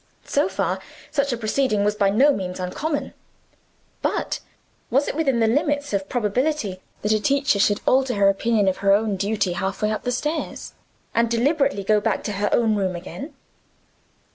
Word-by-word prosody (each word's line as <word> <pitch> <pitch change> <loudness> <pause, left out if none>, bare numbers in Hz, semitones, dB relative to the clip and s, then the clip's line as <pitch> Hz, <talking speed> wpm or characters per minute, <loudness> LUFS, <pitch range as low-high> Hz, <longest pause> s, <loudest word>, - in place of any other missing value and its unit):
So - - +1
far, - - -1 0.3
such 280 -1 0
a 240 - -1
proceeding 220 -1 +1
was 210 0 +2
by 200 -2 +2
no 265 +9 +4
means 185 -5 -4
uncommon. 285 - -3 0.9
But - - -1 0.5
was 275 +5 +2
it - - -1
within 275 -6 +1
the - - +5
limits 285 +3 0
of 195 -1 -1
probability 235 -3 -1 0.2
that 210 - +1
a 215 - +3
teacher 275 -4 +2
should 205 0 +2
alter 260 -2 +3
her 200 -1 +4
opinion 205 +1 +2
of 190 - +1
her 195 0 +3
own 210 0 +2
duty 200 0 0
half 190 +3 -3
way 210 - +2
up 215 - -2
the 245 - -2
stairs, 300 +6 -3 0.4
and 230 0 +2
deliberately 275 -1 +1
go 210 +1 +3
back - - -1
to - - -3
her 205 0 -1
own 225 -2 +3
room 190 -3 0
again? 275 - -8
220 Hz, 180 wpm, -23 LUFS, 200-275 Hz, 0.9 s, the